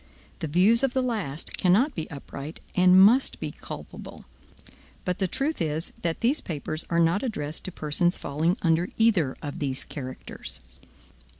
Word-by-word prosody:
The 160 Hz, -, -3 dB
views 190 Hz, +9 st, +4 dB
of 270 Hz, -2 st, +1 dB
the 260 Hz, -, +2 dB
last 195 Hz, -, -1 dB
cannot 215 Hz, +11 st, +3 dB
be 160 Hz, -, -5 dB
upright, 145 Hz, +1 st, -8 dB
and 180 Hz, +1 st, +6 dB
must 230 Hz, +8 st, +5 dB
be -, -, -4 dB
culpable. -, -, -9 dB, 0.8 s
But 180 Hz, 0 st, -1 dB
the 190 Hz, -, +1 dB
truth 275 Hz, -, -2 dB
is, 155 Hz, 0 st, -2 dB
that 165 Hz, -1 st, -2 dB
these 260 Hz, +6 st, +2 dB
papers 155 Hz, 0 st, -2 dB
are 170 Hz, -, +2 dB
not 170 Hz, +4 st, +3 dB
addressed 155 Hz, -, -3 dB
to 185 Hz, -, -2 dB
persons 170 Hz, +3 st, +1 dB
falling 160 Hz, +7 st, 0 dB
under 165 Hz, +1 st, +2 dB
either 200 Hz, -12 st, +3 dB
of 145 Hz, -2 st, -5 dB
these 135 Hz, -3 st, -1 dB
characters. 130 Hz, -3 st, -7 dB
175 Hz, 160 wpm, -26 LUFS, 150-210 Hz, 0.8 s, and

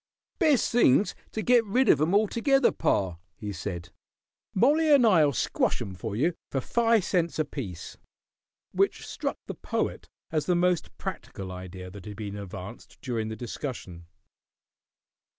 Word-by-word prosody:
"Best 305 Hz, -, +3 dB
thing's 210 Hz, -, +4 dB, 0.2 s
to 220 Hz, -, -3 dB
get 245 Hz, -2 st, +5 dB
rid 245 Hz, +5 st, +1 dB
of 145 Hz, -, +5 dB
'em 165 Hz, +6 st, +2 dB
altogether, 235 Hz, +6 st, +3 dB
pa," 90 Hz, -4 st, 0 dB, 0.2 s
he 105 Hz, -1 st, -6 dB
said. 85 Hz, -1 st, -6 dB, 0.6 s
"Mollie 300 Hz, +9 st, +4 dB
and 275 Hz, -4 st, +7 dB
I'll 160 Hz, -9 st, +5 dB
squash 130 Hz, -, 0 dB
'em 95 Hz, -, -5 dB
for 100 Hz, +4 st, -5 dB
you 160 Hz, +10 st, +2 dB, 0.2 s
for 135 Hz, -, -1 dB
fi' 230 Hz, -, +3 dB
cents 175 Hz, -3 st, 0 dB
apiece." 135 Hz, -, -5 dB, 0.7 s
Which -, -, +1 dB
struck -, -, -3 dB
the -, -, -5 dB
Poet -, -, -3 dB, 0.2 s
as 155 Hz, -2 st, -1 dB
the 180 Hz, -, +3 dB
most 175 Hz, -1 st, 0 dB
practical 95 Hz, -1 st, -6 dB
idea 90 Hz, 0 st, -8 dB
that 100 Hz, 0 st, -11 dB
had 105 Hz, -1 st, -7 dB
been 105 Hz, -2 st, -5 dB
advanced 100 Hz, -3 st, -9 dB
during 115 Hz, -3 st, -2 dB
the 110 Hz, -, -4 dB
discussion. 110 Hz, -, -6 dB
145 Hz, 150 wpm, -27 LUFS, -, 0.7 s, and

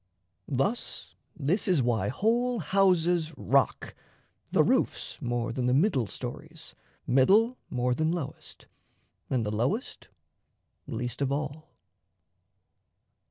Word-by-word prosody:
Thus, 170 Hz, -, -2 dB, 0.3 s
this 160 Hz, +8 st, 0 dB
is 175 Hz, -9 st, +3 dB
why 120 Hz, -2 st, +1 dB
whole 235 Hz, -, +1 dB
houses 175 Hz, -3 st, +2 dB
rock, 135 Hz, +1 st, +1 dB, 0.6 s
the -, -, +4 dB
roofs -, -, 0 dB
More 120 Hz, -1 st, -2 dB
than 125 Hz, 0 st, -1 dB
the 125 Hz, -, +3 dB
middle 140 Hz, -, +2 dB
stories, 155 Hz, +8 st, -8 dB, 0.3 s
middle 200 Hz, -, +4 dB
more 125 Hz, 0 st, 0 dB
Than 155 Hz, +5 st, 0 dB
lowest, 170 Hz, -6 st, -6 dB, 0.6 s
and 125 Hz, -4 st, 0 dB
the 105 Hz, -, -2 dB
lowest 130 Hz, -, -2 dB, 0.8 s
least 120 Hz, +2 st, -4 dB
of 140 Hz, -1 st, +1 dB
all. 150 Hz, +2 st, -4 dB
145 Hz, 110 wpm, -28 LUFS, 125-185 Hz, 0.8 s, the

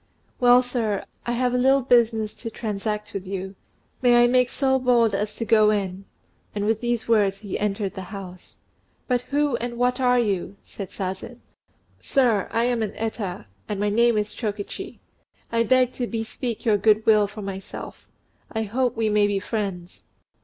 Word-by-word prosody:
"Well, 245 Hz, 0 st, +6 dB
sir, 230 Hz, -5 st, -2 dB, 0.2 s
I 240 Hz, -, 0 dB
have 250 Hz, +1 st, +1 dB
a 250 Hz, -, +2 dB
little 270 Hz, +1 st, +4 dB
business 230 Hz, -3 st, +3 dB
to 230 Hz, -, -7 dB
transact 210 Hz, -1 st, -4 dB
with 195 Hz, -1 st, -5 dB
you. 190 Hz, 0 st, -4 dB, 0.5 s
May 240 Hz, -1 st, +6 dB
I -, -, +6 dB
make 250 Hz, 0 st, +3 dB
so 265 Hz, -1 st, +1 dB
bold 240 Hz, -4 st, +3 dB
as 210 Hz, +2 st, -2 dB
to 230 Hz, -, -3 dB
go 215 Hz, -1 st, +5 dB
in?" 195 Hz, -2 st, -2 dB, 0.5 s
And 205 Hz, 0 st, -1 dB
with 220 Hz, +1 st, +1 dB
these 240 Hz, -2 st, -1 dB
words, 205 Hz, -4 st, +3 dB
he 205 Hz, -3 st, -4 dB
entered 200 Hz, -1 st, -1 dB
the 190 Hz, -, -6 dB
house. 190 Hz, -3 st, -10 dB, 0.5 s
"But 250 Hz, -2 st, +1 dB
who 285 Hz, -3 st, +1 dB
and 235 Hz, 0 st, -5 dB
what 250 Hz, +1 st, +1 dB
are 250 Hz, -1 st, +3 dB
you?" 200 Hz, -3 st, -1 dB
said 195 Hz, -3 st, -8 dB
Sazen. 190 Hz, +5 st, -6 dB, 0.6 s
"Sir, 240 Hz, -8 st, +2 dB
I 230 Hz, -, +1 dB
am 240 Hz, -1 st, +1 dB
an 210 Hz, -2 st, -2 dB
Eta; 215 Hz, -, -4 dB, 0.2 s
and 205 Hz, -, -2 dB
my 205 Hz, 0 st, +1 dB
name 235 Hz, +2 st, +3 dB
is 210 Hz, 0 st, -1 dB
Chokichi. 210 Hz, -3 st, -5 dB, 0.5 s
I 230 Hz, 0 st, +2 dB
beg 255 Hz, +2 st, +3 dB
to 245 Hz, -, -3 dB
bespeak 230 Hz, +1 st, -4 dB
your 215 Hz, -3 st, +4 dB
goodwill 215 Hz, 0 st, +4 dB
for 205 Hz, +1 st, -9 dB
myself: 195 Hz, -1 st, -8 dB, 0.4 s
I 220 Hz, -1 st, -1 dB
hope 240 Hz, +3 st, -1 dB
we 225 Hz, -1 st, +1 dB
may 210 Hz, -1 st, +3 dB
be 205 Hz, -1 st, 0 dB
friends." 195 Hz, -4 st, -4 dB
220 Hz, 175 wpm, -24 LUFS, 205-245 Hz, 0.6 s, Well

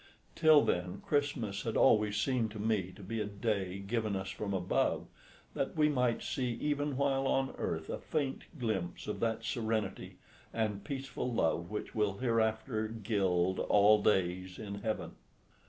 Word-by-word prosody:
Till 155 Hz, -3 st, +6 dB
then 90 Hz, +2 st, -1 dB
Christmas 130 Hz, -9 st, 0 dB
had 115 Hz, +1 st, -2 dB
always 105 Hz, -1 st, +4 dB
seemed 120 Hz, 0 st, +1 dB
to 105 Hz, 0 st, -8 dB
me 105 Hz, -4 st, 0 dB
to 100 Hz, -, -12 dB
be 110 Hz, +4 st, -3 dB
a -, -, -1 dB
day 100 Hz, -2 st, -2 dB
given 105 Hz, +1 st, -1 dB
us 95 Hz, 0 st, -3 dB
from 105 Hz, -2 st, -4 dB
above, 90 Hz, -2 st, +1 dB, 0.5 s
that -, -, -2 dB
we 150 Hz, -1 st, +5 dB
might 125 Hz, -5 st, +1 dB
see 125 Hz, -2 st, -1 dB
even 145 Hz, +2 st, -1 dB
while 135 Hz, -1 st, +1 dB
on 135 Hz, 0 st, +1 dB
earth 80 Hz, -1 st, -2 dB
a -, -, -4 dB
faint 140 Hz, -4 st, -2 dB
glimpse 95 Hz, -9 st, -2 dB
of 105 Hz, -, -4 dB
that 115 Hz, -1 st, 0 dB
serenity 110 Hz, -3 st, -2 dB, 0.3 s
and 105 Hz, -3 st, -1 dB
peaceful 135 Hz, -3 st, -4 dB
love 85 Hz, -5 st, +1 dB
which 105 Hz, 0 st, -5 dB
will 105 Hz, -3 st, 0 dB
hereafter 110 Hz, -1 st, 0 dB
gild 95 Hz, -5 st, 0 dB
all 105 Hz, +1 st, +5 dB
days 95 Hz, -2 st, +1 dB
in 100 Hz, -1 st, -6 dB
heaven. 110 Hz, 0 st, -2 dB
110 Hz, 155 wpm, -33 LUFS, 100-125 Hz, 0.5 s, Till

